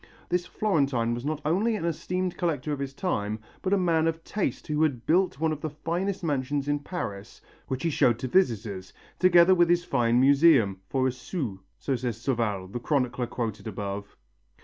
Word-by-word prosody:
This 175 0 0
Florentine 140 - +1
was 120 +2 -5
not 155 0 -2
only 200 +9 +2
an 185 - -3
esteemed 180 +2 -2
collector 155 -4 -1
of 140 - -4
his 140 -1 -3
time, 110 - -2 0.2
but 185 - -2
a 200 - +4
man 165 -3 +2
of 165 0 -2
taste 210 - -2
who 150 -1 -1
had 130 -7 0
built 180 -3 +2
one 160 0 +1
of 150 -1 -4
the 155 - -2
finest 175 +6 -3
mansions 140 -2 -1
in 145 0 +1
Paris, 115 - -6 0.3
which 130 0 -3
he 165 - +1
showed 120 -5 +3
to 130 - -4
visitors, 110 - 0 0.3
together 175 0 +6
with 175 -2 +4
his 175 0 +3
fine 120 -6 +2
museum, 135 - +5
"for 130 -1 +1
a - - +1
sou," 125 - -5 0.2
so 135 - -1
says 120 -2 -3
Sauval, 115 -6 -1
the 120 - -4
chronicler 125 -2 0
quoted 110 -4 -4
above. 100 -1 -5
140 Hz, 190 wpm, -27 LUFS, 120-170 Hz, 0.3 s, together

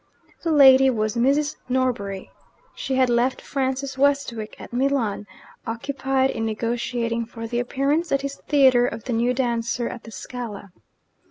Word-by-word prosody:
The 330 - -1
lady 270 -3 +7
was 215 -3 -1
Mrs. 280 +5 +1
Norbury. 240 -7 -1 0.4
She 265 - -3
had 260 -1 +4
left 245 +2 +1
Francis 265 0 -3
Westwick 275 -6 0
at - - -11
Milan, 245 -6 0 0.4
occupied 265 +3 -1
in 225 - -4
negotiating 230 +1 -2
for 230 -1 -8
the 240 +1 -2
appearance 280 +7 0
at 275 0 +1
his 280 0 -4
theatre 260 -4 +5
of 225 -2 -6
the 250 - -3
new 240 +2 +1
dancer 235 -1 -1
at 240 - -7
the - - -12
Scala. 210 -1 -7
250 Hz, 150 wpm, -23 LUFS, 230-270 Hz, 0.4 s, lady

